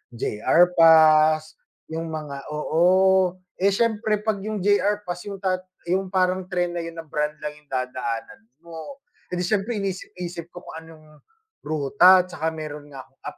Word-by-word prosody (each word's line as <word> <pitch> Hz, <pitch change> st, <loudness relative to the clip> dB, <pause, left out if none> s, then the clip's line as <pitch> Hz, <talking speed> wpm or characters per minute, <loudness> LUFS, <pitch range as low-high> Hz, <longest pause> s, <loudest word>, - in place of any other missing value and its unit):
JR 115 Hz, +9 st, +2 dB, 0.2 s
pass 155 Hz, -1 st, +5 dB, 0.3 s
yung 165 Hz, +1 st, -4 dB
mga 150 Hz, -3 st, -6 dB
oo. 180 Hz, +4 st, +3 dB, 0.2 s
Eh 195 Hz, -, +3 dB
sIyempre 215 Hz, 0 st, 0 dB
pag 215 Hz, -2 st, -1 dB
yung 210 Hz, -1 st, -4 dB
JR 205 Hz, +1 st, +2 dB
pass 175 Hz, +1 st, -6 dB
yung 200 Hz, -1 st, -5 dB
tat 185 Hz, -1 st, +1 dB, 0.3 s
yung 190 Hz, +1 st, 0 dB
parang 185 Hz, 0 st, 0 dB
tren 180 Hz, -2 st, -1 dB
na 175 Hz, -, -4 dB
yun 165 Hz, 0 st, -6 dB
na 165 Hz, -, -7 dB
brand 150 Hz, 0 st, -2 dB
lang 150 Hz, -, -3 dB
yung 150 Hz, -, -30 dB
dadaanan 125 Hz, -4 st, -4 dB, 0.2 s
mo. 170 Hz, -, -10 dB, 0.2 s
Eh 180 Hz, -, -5 dB
di 180 Hz, -, -2 dB
siyempre 210 Hz, +5 st, -1 dB
inisip-isip 180 Hz, -4 st, -5 dB
ko 175 Hz, 0 st, -12 dB
kung -, -, -10 dB
anong 155 Hz, -2 st, -17 dB, 0.4 s
ruta 180 Hz, +5 st, +4 dB
tsaka 180 Hz, -3 st, -5 dB
meron 150 Hz, -2 st, -7 dB
nga 135 Hz, -2 st, -10 dB
akong 135 Hz, +1 st, -30 dB
app -, -, -8 dB
175 Hz, 165 wpm, -23 LUFS, 155-190 Hz, 0.4 s, pass